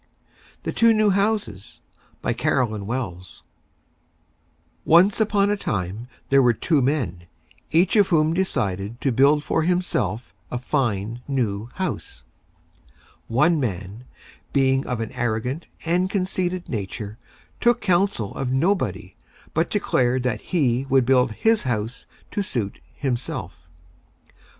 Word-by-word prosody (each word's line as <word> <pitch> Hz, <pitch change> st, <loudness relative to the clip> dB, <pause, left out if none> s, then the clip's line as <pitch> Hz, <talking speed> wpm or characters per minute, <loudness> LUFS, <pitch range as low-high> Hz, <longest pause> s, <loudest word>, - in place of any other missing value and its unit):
THE -, -, -2 dB
TWO 230 Hz, -1 st, +4 dB
NEW 215 Hz, -1 st, +4 dB
HOUSES 195 Hz, -, -1 dB, 0.4 s
BY -, -, +1 dB
CAROLYN 110 Hz, -5 st, 0 dB
WELLS 95 Hz, -8 st, -5 dB, 1.4 s
Once 185 Hz, +7 st, +5 dB
on 205 Hz, -1 st, +2 dB
a -, -, +2 dB
Time, 105 Hz, -, -3 dB, 0.2 s
there 140 Hz, 0 st, +5 dB
were 120 Hz, -2 st, +4 dB
Two 155 Hz, +2 st, +2 dB
Men, 115 Hz, -, -1 dB, 0.4 s
each 175 Hz, +6 st, +3 dB
of 205 Hz, -3 st, +5 dB
whom 160 Hz, -1 st, +3 dB
decided 105 Hz, -, -1 dB
to 135 Hz, -, +1 dB
build 140 Hz, +5 st, +4 dB
for 160 Hz, -, 0 dB
himself 155 Hz, -, -1 dB, 0.2 s
a 125 Hz, -, -3 dB
Fine, 120 Hz, -4 st, -1 dB
New 115 Hz, -5 st, -1 dB
House. 190 Hz, -1 st, -4 dB, 1.0 s
One 150 Hz, +8 st, +3 dB
Man, 105 Hz, -1 st, -4 dB, 0.5 s
being 135 Hz, -1 st, +2 dB
of 125 Hz, -2 st, -2 dB
an 110 Hz, -, -4 dB
Arrogant 120 Hz, +6 st, -2 dB, 0.2 s
and 180 Hz, +3 st, +1 dB
Conceited 185 Hz, -2 st, -1 dB
Nature, 105 Hz, 0 st, -5 dB, 0.4 s
took 240 Hz, -1 st, +3 dB
counsel 185 Hz, -, +1 dB
of 130 Hz, -2 st, -3 dB
Nobody, 130 Hz, -, 0 dB, 0.4 s
but -, -, +1 dB
declared 125 Hz, 0 st, +1 dB
that 125 Hz, -3 st, -1 dB
he 135 Hz, -8 st, +1 dB
would 135 Hz, -2 st, +4 dB
build 125 Hz, -1 st, +3 dB
his 225 Hz, -, +2 dB
House 120 Hz, -2 st, -3 dB, 0.2 s
to 205 Hz, -, -1 dB
suit 115 Hz, -, -3 dB
himself. 125 Hz, -, -4 dB
130 Hz, 125 wpm, -23 LUFS, 110-175 Hz, 1.4 s, Once